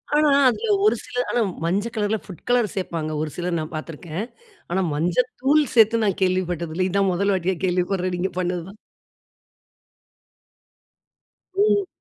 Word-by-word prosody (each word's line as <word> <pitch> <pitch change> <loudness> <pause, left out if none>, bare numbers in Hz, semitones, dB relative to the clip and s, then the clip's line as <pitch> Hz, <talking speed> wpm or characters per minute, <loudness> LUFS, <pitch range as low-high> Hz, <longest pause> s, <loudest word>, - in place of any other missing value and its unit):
ஆனா, 300 0 +4 0.2
அதுல 435 - -2 0.2
ஒரு 430 - +5
சில 245 - -8
ஆனா 240 - +1 0.2
மஞ்ச 195 +6 0
கலர்ல 215 +1 0
புட் 185 -4 -11
கலர் 240 -4 +3
சேப்பாங்க 165 -4 -3
ஒரு 155 - -2
சிலர். 175 -1 -2
நான் 155 +1 -6
பாத்துருக்கேன். 160 +4 -5 0.5
ஆனா, 190 +2 +1
மஞ்ச 165 +4 0 0.3
தூள் 295 +3 +4
சேத்து 225 0 +5
நான் 195 -2 0
கேள்விப்பட்டது 175 -3 0
இல்ல. 185 +1 +1
இதுதான் 195 0 +2
1 200 +3 +1
வாட்டியா 185 +1 0
கேள்விப்படுறேன் 180 0 0
நீங்க 190 +2 -1
பண்ணதுதான். 180 +3 -3 2.8
ம். 405 -1 +3
185 Hz, 140 wpm, -23 LUFS, 175-220 Hz, 2.8 s, ஒரு